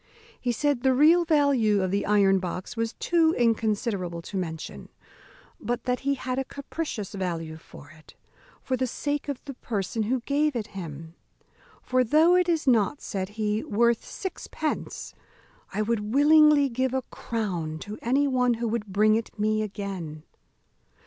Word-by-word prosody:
He 245 - 0
said 285 +1 0
the 260 0 +3
real 325 +5 +5
value 275 - +3
of 185 - -1
the 200 +1 0
iron 200 -2 +4
box 180 +3 -5
was 230 0 -2
too 330 -1 +2
inconsiderable 210 -6 0
to 200 - -9
mention; 165 -4 -5 0.7
but 240 0 -3
that 250 -1 0
he 280 +1 0
had 255 0 -3
a - - 0
capricious 280 - -5
value 170 -5 -3
for 150 -2 -14
it, 155 0 -18 0.5
for 260 - 0
the 255 0 -1
sake 290 +4 -3
of 280 - -5
the 280 - -6
person 220 -3 -3
who 240 +4 0
gave 290 +3 +1
it 220 -3 -3
him; 165 -3 -7 0.7
"for, 255 0 +2
though 315 +8 +5
it 360 -1 +3
is 325 -3 +1
not," 245 +2 +3
said 190 -2 -4
he, 215 0 0
"worth 235 +2 +2
sixpence, 315 -4 -5 0.6
I 210 +2 -1
would 215 -1 -1
willingly 300 0 +6
give 260 +1 -1
a 260 - 0
crown 180 -9 -3
to 210 +1 -7
any 275 +4 +2
one 250 -2 +2
who 235 +1 -2
would 220 -1 -2
bring 210 +2 +3
it 225 0 -2
me 215 +1 +1
again." 190 -7 -5
230 Hz, 160 wpm, -26 LUFS, 200-275 Hz, 0.7 s, willingly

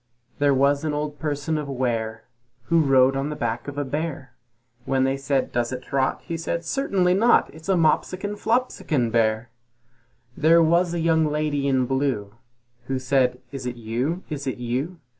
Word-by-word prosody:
There 145 0 +4
was 140 +2 +2
an 155 -2 -1
old 150 0 -4
person 150 +1 -2
of 145 -2 -5
Ware 115 -4 -2 0.4
Who 165 +7 +2
rode 135 -2 +4
on 135 +2 -1
the 150 - -4
back 120 -3 -3
of 145 0 -6
a 145 - -1
bear; 145 -2 -4 0.5
When 135 -1 +1
they 135 0 +1
said, 135 -1 -1
"Does 120 0 -1
it 130 0 -5
trot?" 135 -1 -1
He 165 -2 -4
said, 170 +1 -3
"Certainly 190 -6 +1
not, 230 +6 +3
It's 160 +4 -11
a 190 - +4
Moppsikon 185 +5 +1
Floppsikon 205 - 0
bear." 110 0 +1 0.8
There 165 +2 +5
was 170 +2 +2
a - - -1
young 160 -1 +3
lady 150 -2 -1
in 130 -2 +2
blue, 130 -6 -1 0.5
Who 135 - -1
said, 130 -1 +1
"Is 135 -3 -5
it 125 - -4
you? 120 +10 -2
Is 145 -3 -5
it 130 - -2
you?" 130 +9 -3
140 Hz, 180 wpm, -24 LUFS, 130-160 Hz, 0.8 s, There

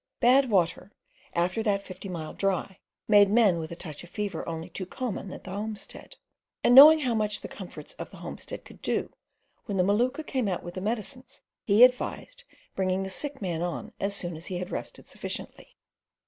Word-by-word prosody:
Bad 260 +2 +5
water 180 -1 +1 0.4
after 175 +5 +1
that 200 -3 0
fifty 185 +1 -8
mile 165 -3 -5
dry 195 0 -1 0.3
made 205 -2 +6
men 205 -5 +4
with 160 0 -6
a - - -5
touch 155 -3 -7
of 175 - -13
fever 205 +1 -3
only 165 +1 -5
too 180 +1 -6
common 210 -4 -4
at - - -9
the 185 - -8
homestead, 210 - -6 0.5
and 240 - +5
knowing 305 +4 +10
how 250 -4 0
much 210 -2 0
the - - -6
comforts - - -9
of - - -6
the - - -13
homestead - - -7
could - - -15
do, - - -1 0.5
when 200 -3 -3
the 180 - +4
Maluka 245 +10 +1
came 255 -7 -1
out 180 -3 -2
with 175 - -7
the 185 - -5
medicines 235 +5 -4 0.2
he 210 +3 +6
advised 370 - +1 0.3
bringing 190 0 0
the 190 - -5
sick 280 +2 -2
man 170 -3 -2
on 175 -1 -4
as 200 +1 0
soon 175 -3 -3
as 160 +2 -6
he 185 - -3
had 180 +1 -5
rested - - -6
sufficiently. - - -6
200 Hz, 195 wpm, -27 LUFS, 180-235 Hz, 0.5 s, knowing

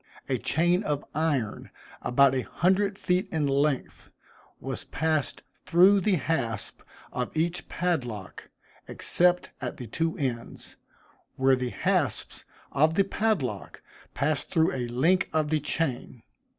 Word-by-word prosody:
A - - 0
chain 175 +3 +2
of 150 -7 -2
iron, 145 -9 -1 0.3
about 135 +2 +4
a 130 - +1
hundred 195 +7 +1
feet 180 -1 0
in 155 -3 0
length, 140 0 -1 0.5
was - - -5
passed 155 -3 -1 0.2
through 185 +3 +5
the 195 +1 +2
hasp 125 - -2 0.3
of 125 +4 -4
each 170 +2 -1
padlock, 125 - -3 0.4
except 180 0 +2
at 125 - -4
the 125 - -7
two 165 +8 -2
ends, 120 -5 -5 0.6
where 130 0 +4
the 125 -1 -2
hasps - - -1 0.3
of 155 +3 +3
the 195 - +4
padlock 190 - -2 0.3
passed 150 +1 -1
through 160 -2 +2
a 125 -2 -2
link 160 +11 +2
of 155 -1 +1
the 155 - +2
chain. 135 -5 -3
155 Hz, 130 wpm, -27 LUFS, 130-175 Hz, 0.6 s, through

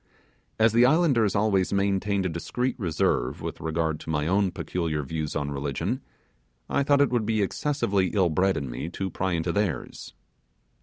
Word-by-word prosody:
As 110 0 +4
the 120 +1 +5
islanders 130 - +3
always 100 -3 +2
maintained 100 0 +1
a - - +1
discreet 125 +10 -2
reserve 75 - 0
with - - -6
regard 80 -1 -1
to - - -10
my 75 -2 0
own 95 +3 +2
peculiar 85 -3 -3
views 75 +1 -4
on 70 -1 -2
religion, 70 -1 -2 0.7
I - - +1
thought 140 0 +3
it 140 -4 +3
would 120 -3 +1
be 110 -2 +2
excessively 100 -5 0
ill 95 -2 +2
bred 95 +4 +2
of - - -2
me 65 +5 -5
to 95 +1 -4
pry 95 +1 -1
into 85 +1 0
theirs. 90 -11 -3
95 Hz, 170 wpm, -26 LUFS, 80-110 Hz, 0.7 s, the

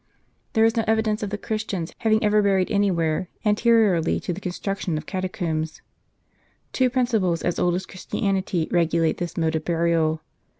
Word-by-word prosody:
There 225 -1 +4
is 225 +1 +2
no 225 - +1
evidence 220 -1 +1
of 205 - -2
the 210 - -3
Christians 205 -6 -3
having 220 -1 +2
ever 210 0 +4
buried 195 -2 +2
any 205 -1 +3
where, 165 0 0 0.2
anteriorily 210 -5 +3
to 180 - -3
the 185 - -8
construction 185 -2 -3
of - - -6
catacombs. 175 -5 -3 0.9
Two 255 -1 +3
principles 225 -9 +1
as 175 - -1
old 175 -1 +2
as 185 +1 -3
Christianity 185 -2 -2
regulate 165 -1 +2
this 175 -2 -4
mode 160 -1 +1
of 155 - -2
burial. 165 -2 +1
185 Hz, 165 wpm, -24 LUFS, 170-215 Hz, 0.9 s, There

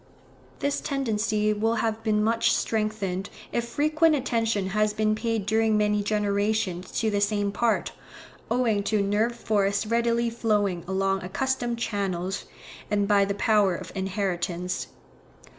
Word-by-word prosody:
This 285 0 0
tendency 215 -5 0
will 225 +2 0
have 220 0 -1
been 215 -1 +1
much 230 +1 +2
strengthened, 210 -4 -2 0.2
if 235 0 -1
frequent 310 +4 +2
attention 225 -7 0
has 215 +1 +1
been 215 0 +1
paid 220 -1 -1
during 220 0 +2
many 210 0 +2
generations 205 -3 0
to 220 -1 +1
the 205 0 0
same 205 -1 +1
part, 230 +2 0 0.6
owing 230 -4 +2
to 215 -1 +1
nerve 215 +4 +1
force 200 -3 0
readily 235 +1 +1
flowing 205 -6 0
along 195 0 0
accustomed 240 +4 -1
channels, 195 -4 -2 0.4
and 205 -1 +1
by 200 -1 +4
the 200 0 -2
power 205 -3 +3
of - - -8
inheritance. 185 -2 -2
215 Hz, 135 wpm, -26 LUFS, 200-230 Hz, 0.6 s, by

